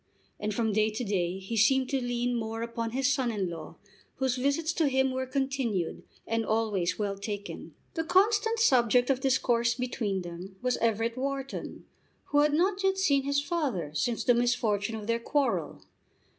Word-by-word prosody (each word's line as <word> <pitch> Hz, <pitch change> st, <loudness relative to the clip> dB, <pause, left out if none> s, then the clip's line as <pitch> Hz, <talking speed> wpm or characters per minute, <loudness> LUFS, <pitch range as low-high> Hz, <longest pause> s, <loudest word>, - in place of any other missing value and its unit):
And 210 Hz, -, -2 dB
from 220 Hz, 0 st, 0 dB
day 215 Hz, +1 st, +3 dB
to 220 Hz, +3 st, -4 dB
day 185 Hz, -4 st, -1 dB
he 195 Hz, +4 st, -5 dB
seemed 260 Hz, +4 st, +3 dB
to 270 Hz, -1 st, 0 dB
lean 245 Hz, 0 st, -1 dB
more 225 Hz, 0 st, -3 dB
upon 230 Hz, 0 st, -3 dB
his 265 Hz, +3 st, +1 dB
son 260 Hz, -4 st, 0 dB
in 195 Hz, -5 st, -2 dB
law, 160 Hz, -2 st, -8 dB, 0.4 s
whose 260 Hz, -1 st, 0 dB
visits 285 Hz, +5 st, 0 dB
to 320 Hz, -3 st, +2 dB
him 265 Hz, -1 st, +2 dB
were 260 Hz, 0 st, -2 dB
continued, 260 Hz, -, -1 dB, 0.2 s
and 225 Hz, 0 st, 0 dB
always 215 Hz, -5 st, 0 dB
well 205 Hz, -2 st, -1 dB
taken. 205 Hz, 0 st, -6 dB, 0.2 s
The 325 Hz, -, -1 dB
constant 420 Hz, +6 st, +3 dB
subject 250 Hz, -, +4 dB
of 260 Hz, -, +1 dB
discourse 240 Hz, -3 st, +2 dB
between 225 Hz, -6 st, -2 dB
them 175 Hz, +3 st, -8 dB
was 250 Hz, 0 st, 0 dB
Everett 230 Hz, +1 st, 0 dB
Wharton, 275 Hz, 0 st, -4 dB, 0.4 s
who 290 Hz, -, +3 dB
had 295 Hz, 0 st, +4 dB
not 380 Hz, +5 st, +1 dB
yet 385 Hz, 0 st, +2 dB
seen 280 Hz, -8 st, +2 dB
his 280 Hz, 0 st, +1 dB
father 275 Hz, -, -2 dB
since 235 Hz, +9 st, -1 dB
the 245 Hz, -, +5 dB
misfortune 230 Hz, -3 st, +1 dB
of 215 Hz, -1 st, -6 dB
their 230 Hz, +1 st, 0 dB
quarrel. 280 Hz, +4 st, -1 dB
245 Hz, 175 wpm, -29 LUFS, 215-275 Hz, 0.4 s, the